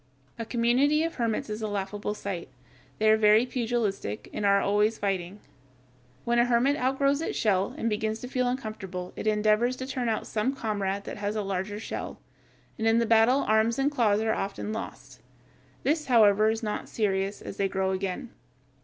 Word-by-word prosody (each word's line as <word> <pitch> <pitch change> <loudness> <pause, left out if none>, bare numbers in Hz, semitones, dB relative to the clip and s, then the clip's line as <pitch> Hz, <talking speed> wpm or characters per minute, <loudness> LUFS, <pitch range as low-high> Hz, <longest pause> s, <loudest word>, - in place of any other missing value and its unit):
A 230 - -3
community 255 +7 +2
of 330 0 -2
hermits 230 -3 -1
is 215 +1 -5
a 215 - -1
laughable 205 +1 -3
sight. 195 -5 -5 0.5
They 220 - +1
are 220 - +5
very 215 +2 +5
pugilistic, 230 - -2
and 205 - 0
are 200 0 +5
always 210 +3 +2
fighting. 195 0 -2 0.9
When 240 0 +2
a 240 - +5
hermit 245 +4 +3
outgrows 275 +2 +1
its - - -3
shell 195 -3 +1
and 230 - -2
begins 220 0 -1
to 250 - -6
feel 250 0 0
uncomfortable 215 -8 -5
it - - -5
endeavors 215 +3 +2
to 260 - -6
turn 255 -3 -2
out 220 - -1
some 240 +6 -1
comrade 200 -4 -2
that - - -7
has 205 +1 -3
a 210 - -1
larger 195 +2 -3
shell, - - -6 0.6
and 220 - +1
in 225 +1 +4
the 235 - +2
battle 230 +4 +4
arms 220 +1 +2
and 275 +2 +1
claws 220 -6 +2
are 220 0 +1
often 200 +2 -3
lost. 225 - -8 0.6
This, 300 +1 0
however, 215 -3 +5
is 225 +1 -2
not 210 -1 -3
serious, 195 -2 -1
as - - -8
they 195 -1 +1
grow 190 0 0
again. 195 +6 -3
220 Hz, 185 wpm, -27 LUFS, 205-240 Hz, 0.9 s, are